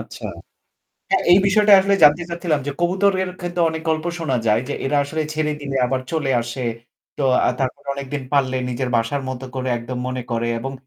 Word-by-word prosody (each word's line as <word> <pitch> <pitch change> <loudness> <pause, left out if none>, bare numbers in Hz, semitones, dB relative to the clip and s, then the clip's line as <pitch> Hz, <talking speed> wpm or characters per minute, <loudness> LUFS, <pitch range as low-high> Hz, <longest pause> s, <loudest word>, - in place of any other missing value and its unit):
আচ্ছা। - - -10 0.9
হ্যাঁ, 385 - +3
এই 180 - +8
বিষয়টা 210 +1 +4
আসলে 200 +1 +2
জানতে 150 +3 +6
চাচ্ছিলাম 170 -3 -1
যে 145 - -1
কবুতরের 185 +1 +2
ক্ষেত্রে 175 0 -3
অনেক 160 0 -5
গল্প 155 0 -1
শোনা 145 -6 -1
যায় 105 +1 +3
যে - - -2
এরা 145 +2 +1
আসলে 155 +3 -2
ছেড়ে 155 -1 0
দিলে 140 -1 -4
আবার 130 +1 -1
চলে 155 -4 0
আসে। 120 +2 -5 0.5
তো - - -3 0.2
আ - - +3
তারপর 135 +1 -2
কতদিন 140 0 -4
পাললে 130 -2 +2
নিজের 125 +1 -2
বাসার 115 +5 -1
মতো 130 0 -5
করে 130 0 -3
একদম 125 +2 -6
মনে 130 0 -3
করে, 115 0 -1
এবং 135 +3 -5
145 Hz, 195 wpm, -21 LUFS, 130-170 Hz, 0.9 s, এই